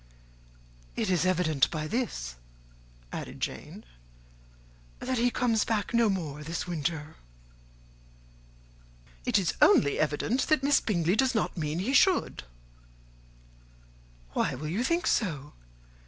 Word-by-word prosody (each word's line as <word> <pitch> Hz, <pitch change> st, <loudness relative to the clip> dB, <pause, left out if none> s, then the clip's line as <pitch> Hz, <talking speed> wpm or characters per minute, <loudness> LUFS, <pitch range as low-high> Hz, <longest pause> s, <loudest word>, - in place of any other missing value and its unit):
"It -, -, -1 dB
is 180 Hz, 0 st, +2 dB
evident 160 Hz, -7 st, +2 dB
by 155 Hz, -2 st, -3 dB
this," 155 Hz, -, -3 dB, 0.8 s
added -, -, -6 dB
Jane, -, -, -5 dB, 1.1 s
"that 255 Hz, -1 st, -2 dB
he 245 Hz, +1 st, +3 dB
comes 235 Hz, -3 st, +1 dB
back 220 Hz, 0 st, -2 dB
no 235 Hz, -2 st, +4 dB
more 155 Hz, -7 st, -3 dB
this 165 Hz, +2 st, -4 dB
winter." 160 Hz, -2 st, -3 dB, 2.1 s
"It -, -, +4 dB
is 190 Hz, -4 st, +1 dB
only 280 Hz, -, +5 dB
evident 155 Hz, -, 0 dB
that 310 Hz, -4 st, +2 dB
Miss 285 Hz, +1 st, +4 dB
Bingley 175 Hz, -3 st, +1 dB
does 260 Hz, +2 st, +2 dB
not 220 Hz, -, 0 dB
mean 155 Hz, -2 st, -2 dB
he 210 Hz, +10 st, -1 dB
should." 370 Hz, +5 st, +3 dB, 1.9 s
"Why -, -, 0 dB
will 150 Hz, +4 st, -5 dB
you 200 Hz, +9 st, -1 dB
think 335 Hz, +6 st, 0 dB
so? 150 Hz, -, -1 dB
185 Hz, 120 wpm, -28 LUFS, 155-245 Hz, 2.1 s, only